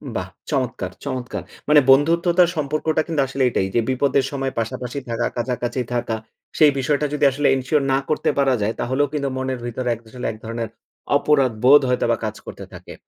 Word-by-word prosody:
বাহ! - - -2 0.2
চমৎকার, - - -2
চমৎকার! 125 -1 -4 0.3
মানে 150 0 +8
বন্ধুত্বতার 170 +5 +4
সম্পর্কটা 155 +1 0
কিন্তু 160 -4 0
আসলে 135 0 -1
এটাই 95 -5 0
যে, - - +4
বিপদের 135 +1 +2
সময় 135 -1 -2
পাশাপাশি 125 +3 -4
থাকা, 115 +1 -1
কাছাকাছি 120 +1 -2
থাকা। 120 -2 -1 0.4
সেই 150 -2 +6
বিষয়টা 145 +3 +1
যদি 150 - +2
আসলে 145 +2 0
এনশিওর 135 +3 0
না - - +4
করতে 155 - +1
পারা 135 -2 +3
যায়, 105 +2 0
তাহলেও 130 +4 +1
কিন্তু 140 -2 -1
মনের 130 -1 -2
ভিতরে 120 +1 -3
এক 115 - -16
আসলে 125 +2 -7
এক 110 - -10
ধরনের 115 0 -4 0.5
অপরাধ 140 -4 +2
বোধ 140 +3 +8
হয়তো 125 - +1
বা 115 - +1
কাজ 110 0 -3
করতে - - -8
থাকে। - - -10
130 Hz, 185 wpm, -21 LUFS, 120-145 Hz, 0.5 s, মানে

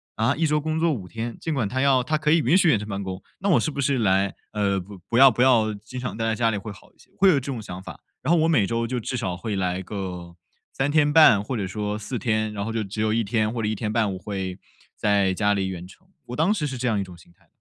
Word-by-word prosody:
啊？ 115 +5 +1
一 160 +2 +1
周 150 0 +2
工 155 +1 -2
作 165 0 +2
5 100 -10 -4
天， 115 +3 -5
尽 160 - -3
管 115 -7 -1
它 130 +3 -1
要 135 -2 +3
它 155 +4 0
可 150 0 +1
以 165 - +5
允 170 +4 +3
许 185 - +4
远 120 -9 +3
程 105 - -7
办 100 -1 -4
公， 95 0 -6 0.2
那 200 - -1
我 170 - +5
是 - - -1
不 140 - -6
是 135 -2 +1
来 95 -2 +2 0.2
呃， 100 -2 +1 0.3
不 115 - +1
要 135 0 +9
不 125 - +1
要 115 -5 +4
经 110 +5 -9
常 125 -3 -5
待 115 - -1
在 110 - +1
家 115 0 +1
里 105 - -1
会 105 +1 -7
好 100 - -15
一 - - -35
些？ - - -23
会 195 +1 +5
有 170 - +5
这 135 - 0
种 120 -4 -5
想 90 -3 -8
法。 - - -10 0.2
然 165 - +2
后 170 - +4
我 160 - +3
每 150 -12 +3
周 115 +2 -1
就 125 +1 -2
至 125 - -4
少 95 -8 -3
会 110 +2 -4
来 95 -1 -1
个 90 -3 -6 0.4
3.5 145 -5 +5
或 125 +5 -4
者 100 -4 -2
说 105 +1 -3
4 120 +4 -4
天， 110 -2 0
然 100 -1 -4
后 115 - -4
就 115 -1 -1
只 105 +2 -5
有 110 0 +1
1 115 - +1
天 110 +1 0
或 115 - -3
者 105 - -1
1.5 110 -1 0
我 - - -5
会 95 -2 -5 0.4
在 100 -2 +2
家 105 0 +2
里 100 -1 -1
远 90 -2 -6
程， 175 - -17 0.2
我 125 - -6
当 160 +8 +2
时 195 -8 0
是 135 -3 -4
这 125 - -1
样 110 -4 +1
一 - - -1
种 90 -2 -11
心 85 0 -19
态。 85 - -30
110 Hz, 295 characters per minute, -24 LUFS, 100-135 Hz, 0.4 s, 要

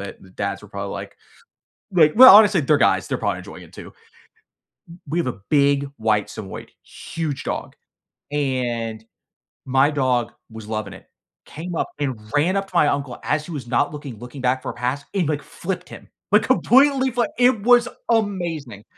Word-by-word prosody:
it. 100 - -8
The 95 - -17
dads 100 +1 -4
were 105 - -14
probably 100 0 -6
like - - -8 0.8
like 160 -5 +4
well, 255 -5 +11
honestly, 205 -4 +6
they're 150 +2 +3
guys, 140 - +2
they're - - -2
probably - - -2
enjoying - - -11
it - - -17
too. - - -9 1.0
W 170 - -12
we 155 +4 -2
have 170 - -1
a 125 - -4
big 140 -1 +3
white 110 -2 +1
Samoyed, 100 -3 -9
huge 160 -5 -6
dog, - - -5 0.6
and 120 -6 -2 0.6
my 135 +2 +3
dog 130 -5 0 0.2
was 110 -1 -10
loving 110 0 -4
it, - - -15 0.4
came 170 +2 -7
up - - -1
and 130 -5 -2 0.2
ran 170 +7 +2
up 195 0 -2
to - - -21
my 150 - +5
uncle 140 -4 -3
as 150 - -1
he 175 - -9
was 140 -6 -6
not 130 +5 +1
looking, 145 -6 -8
looking 125 +4 -10
back 130 +1 0
for - - -4
a - - -7
pass 125 +4 -3
and, 180 -6 0
like, 150 -2 -1
flipped 180 0 -6
him, - - -12 0.2
like, 210 - +6
completely 265 +1 +3
flat, 235 -3 0
it 245 -4 +3
was 245 +1 +5 0.2
amazing. 170 - -2
145 Hz, 185 wpm, -21 LUFS, 120-180 Hz, 1.0 s, well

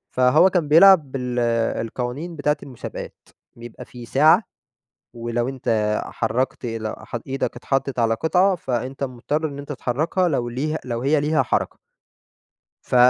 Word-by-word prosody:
فهو 140 +8 +5
كان 175 -5 0
بيلعب 165 -2 +6
بال 125 -2 -2 0.4
القوانين 125 +9 -5
بتاعة 150 0 0
المسابقات، 130 -4 -8 0.4
بيبقى 120 -1 -10
فيه 120 -1 -11
ساعة 155 - +4 0.7
ولو 120 +1 -2
أنت 110 -5 0
حرّكت 120 +3 -2
ل 115 -2 -4
ح - - -9
إيدك 135 +1 -2
اتحطّت 135 -1 -2
على 115 -1 +2
قطعة 180 - +2
فأنت 130 -1 -4
مُضْطر 140 +5 -2
إن 140 -1 -8
أنت 145 +1 -7
تحركها 155 +8 0
لو 125 -6 -1
ليها 150 +6 -2
لو 120 -2 -3
هي 145 +3 +2
ليها 150 +1 +2
حركة - - -1 1.1
ف - - -3
135 Hz, 140 wpm, -22 LUFS, 120-155 Hz, 1.1 s, بيلعب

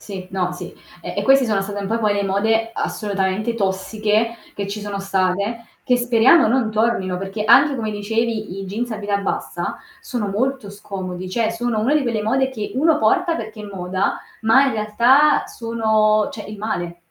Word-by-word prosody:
Sì, 190 -3 -8
no, 180 -2 -1
sì. 180 - -8 0.3
E - - -6
e - - 0
questi 270 0 +5
sono 215 -4 +1
state 205 +1 -5
un 200 - -4
po' 225 +3 0
poi 210 -2 +1
le 200 0 0
mode 225 +4 +1
assolutamente 200 +1 -2
tossiche, 215 +3 0 0.2
che 200 - -4
ci 205 +2 -5
sono 205 -1 -4
state, 195 +4 -1 0.2
che 250 - +3
speriamo 245 +5 +5
non 235 -2 +1
tornino, 215 -5 0
perché 195 +2 -4
anche 270 +6 +6
come 220 -2 -2
dicevi 215 -1 -2
i - - -5
jeans 220 +6 -4
a - - -3
vita 205 -1 -1
bassa 200 - -3 0.2
sono 240 -6 -3
molto 235 +1 -2
scomodi, 185 -2 -6
cioè 225 +2 0
sono 230 0 -2
una 255 +7 +2
di 305 - +3
quelle 230 -4 -1
mode 265 +5 +1
che 215 -5 -5
uno 305 +4 +3
porta 360 0 +2
perché 220 -1 -7
è - - -7
moda, 190 -1 -2 0.2
ma 225 +5 +5
in 265 - 0
realtà 235 +7 +4
sono 220 -2 +1
cioè 210 - -8
il 210 0 -8
male. 175 -5 -3
215 Hz, 190 wpm, -20 LUFS, 200-235 Hz, 0.3 s, anche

